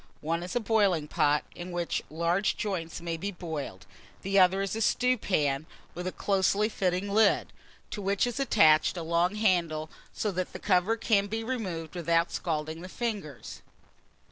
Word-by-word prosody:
One 165 +2 -1
is 180 +4 -6
a - - +3
boiling 200 -8 +2
pot, 150 0 +2
in 175 +1 -7
which 175 -1 -1
large 170 +5 0
joints 170 -6 -3
may 170 -1 -3
be 200 +5 -3
boiled; 160 - -6 0.4
the 195 +1 +3
other 190 +1 +4
is 195 - -3
a 225 - -3
stewpan, 180 - +1 0.3
with 180 +1 -5
a - - -1
closely 200 +2 +1
fitting 185 -2 -1
lid, 215 -1 +3 0.4
to 210 - -4
which 200 +2 +1
is 245 +1 -3
attached 160 - +4
a 170 - -3
long 170 +4 +1
handle; 170 -7 +1 0.2
so 210 - -2
that 185 0 -3
the - - -6
cover 195 +3 +2
can 205 -3 +2
be 225 +2 -3
removed 190 -10 -4
without 170 0 +1
scalding 160 -1 -3
the 185 - -8
fingers. 200 - -5
180 Hz, 170 wpm, -28 LUFS, 165-205 Hz, 0.4 s, other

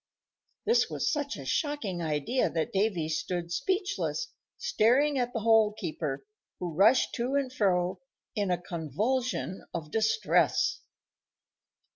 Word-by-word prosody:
This 465 +3 +3
was - - 0
such 290 -1 -2
a - - -8
shocking 290 - -1
idea 155 - 0
that 160 -1 -2
Davy 195 -5 +1
stood 170 +2 -3
speechless, 390 - -1 0.3
staring 270 +6 +3
at 245 -1 0
the 230 - -3
Hole 220 -1 +4
keeper, 145 -3 -4 0.3
who 175 -2 -4
rushed 215 +10 +4
to 250 +3 -1
and 270 -2 0
fro 185 -4 +1 0.4
in 205 -3 0
a 180 -1 +1
convulsion 190 - -2
of 155 -3 -5
distress. 220 - +2
215 Hz, 125 wpm, -29 LUFS, 175-260 Hz, 0.4 s, Hole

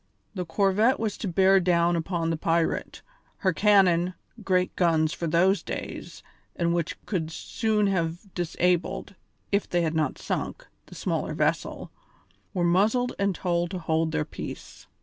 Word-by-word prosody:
The 180 -4 -4
corvette 200 +8 +2
was 220 -3 -1
to 210 - -3
bear 190 +2 +4
down 175 -1 +2
upon 165 0 -1
the - - 0
pirate, 165 +1 -1 0.3
her 190 -2 +1
cannon 185 -2 +4 0.3
great 185 -1 +1
guns 160 -3 +2
for 170 - -3
those 185 +5 +3
days, - - -7 0.3
and 170 -1 +1
which 170 -2 -2
could 165 -6 -2
soon 215 +5 -1
have 180 0 -2
disabled, 175 +2 -1 0.4
if 200 0 +1
they 175 -1 +1
had 160 -1 0
not 155 -4 0
sunk, - - -4 0.2
the - - -12
smaller - - -2
vessel - - -1 0.6
were 180 - -1
muzzled 215 +8 +2
and 200 -2 +1
told 175 -1 0
to 185 - -4
hold 160 -1 0
their 155 -1 -1
peace. - - -9
175 Hz, 150 wpm, -26 LUFS, 165-195 Hz, 0.6 s, bear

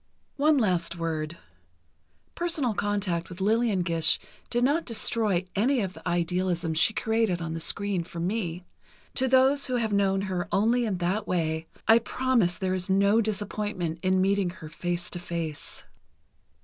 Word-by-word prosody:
One 300 +1 +4
last 180 -8 +1
word: 165 -1 -3 1.0
personal 330 -9 0
contact 200 -5 -1
with 180 0 -9
Lillian 215 -1 +2
Gish 165 -2 +2 0.3
did 240 +1 0
not 295 +6 +2
destroy 220 -5 0
any 245 +5 +2
of 190 -2 -3
the - - -9
idealism 175 -1 0
she 165 +7 +4
created 220 -5 0
on 165 -1 -4
the 165 - -4
screen 195 +2 0
for 170 0 -8
me. 180 -1 -2 0.5
To 260 - +2
those 265 +2 +4
who 255 - -1
have 225 -3 0
known 195 -1 +2
her 185 -3 -2
only 235 +4 +2
in 200 -4 -1
that 185 +5 -1
way, 160 -2 -1 0.2
I 225 +1 +7
promise 235 -7 +1
there 185 -1 -1
is 185 +1 -2
no 200 +3 +4
disappointment 205 -5 -3
in 185 0 +2
meeting 195 -1 +2
her 165 -3 -10
face 175 +2 -3
to 175 - -5
face. 170 -3 -4
190 Hz, 160 wpm, -27 LUFS, 175-225 Hz, 1.0 s, I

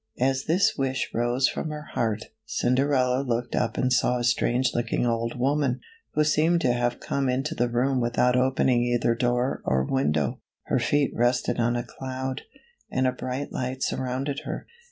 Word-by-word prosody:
As 135 +1 +1
this 180 +4 +3
wish 135 -1 -1
rose 120 +3 +2
from 160 - -3
her 150 0 -7
heart, 110 -2 0 0.2
Cinderella 130 0 +1
looked 120 -2 -2
up 115 -2 0
and 130 0 +2
saw 125 +1 +2
a 120 - -2
strange 120 +2 +2
looking 120 0 0
old 115 0 -1
woman, 135 0 +1 0.4
who 150 - +4
seemed 155 +3 +3
to 125 -6 +3
have 120 0 -1
come 135 -2 -1
into 135 +5 -1
the 120 -5 0
room 125 +2 +1
without 120 +1 +2
opening 130 -1 +3
either 120 -1 +2
door 120 +2 0
or 65 0 +1
window. 75 - 0 0.3
H - - -14
er - - +3
feet 145 -2 +1
rested 120 +1 +1
on 120 +1 +2
a 120 - -1
cloud, 130 +1 -5 0.5
and 130 0 0
a 130 - +3
bright 130 +2 -4
light 130 +1 -3
surrounded 130 +2 -2
her. - - -6
125 Hz, 175 wpm, -26 LUFS, 120-135 Hz, 0.5 s, who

